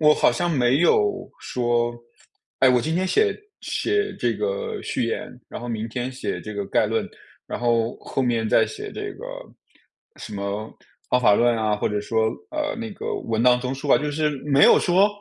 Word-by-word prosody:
我 150 -1 +6
好 - - +3
像 175 0 -1
没 130 -3 +3
有 410 - +2
说： 120 -1 0 0.7
“诶， 130 - +7
我 125 -1 +4
今 160 +4 -2
天 185 +2 +1
写 420 - +2 0.3
写 415 0 -1
这 - - 0
个 460 -1 -3
序 - - -1
言， 115 - -3 0.2
然 - - -7
后 120 - -6
明 110 -1 -3
天 125 +2 -3
写 130 - -4
这 110 - -7
个 100 -1 -3
概 - - +2
论， - - -1 0.4
然 - - -5
后 115 -1 +1
后 135 - -3
面 115 -3 0
再 - - +4
写 420 0 -7
这 415 -1 -5
个 - - -9 0.9
什 110 - -9
么 100 +2 -4 0.4
方 125 - +3
法 105 -4 +5
论 120 +2 +3
啊 110 -2 0
或 - - -1
者 105 0 -1
说， 110 +1 +1 0.2
呃， 305 -1 -2
那 225 -1 -5
个 - - -4
文 115 0 -1
章 125 0 +5
综 130 +1 -3
述 135 +1 -4
啊。” - - +7
就 150 0 -2
是 150 +1 0
没 140 -1 +4
有 - - +7
说， 185 +3 +4
125 Hz, 215 characters per minute, -23 LUFS, 115-180 Hz, 0.9 s, 诶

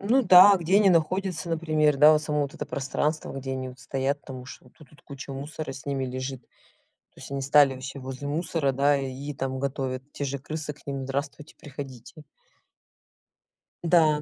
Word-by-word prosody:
Ну 230 +7 +3
да, 195 0 +9
где 180 +3 +2
они 205 -2 +5
находятся, 180 +1 0
например, 155 -3 +1
да, 150 +2 +8
вот 150 - +2
само 150 -1 -1
вот 140 0 -3
это 150 - -5
пространство, 145 +2 -2
где 135 -1 -5
они 130 -1 -4
стоят 135 +1 -2
там 130 -2 -9
уж 125 - -10
вот 125 - -21
тут 150 -4 -17
вот 150 - -20
куча 140 0 -9
мусора 150 +3 -6
с 135 0 -10
ними 135 -2 -2
лежит. 130 0 -5 0.5
То - - -23
есть - - -10
они 140 0 -3
стали 140 -1 +4
все 135 +2 -7
возле 130 +1 -7
мусора, 155 -2 -1
да, 140 +2 +3
и 135 +2 -5
там 130 0 -3
готовят, 130 -1 -3
те 145 - -4
же 140 0 -3
крысы 150 +2 -5
к 150 - -22
ним: 135 -1 -4
здравствуйте 140 +3 -5
приходите. 140 0 -10 1.6
Да. 160 -3 +4
140 Hz, 185 wpm, -26 LUFS, 135-155 Hz, 1.6 s, да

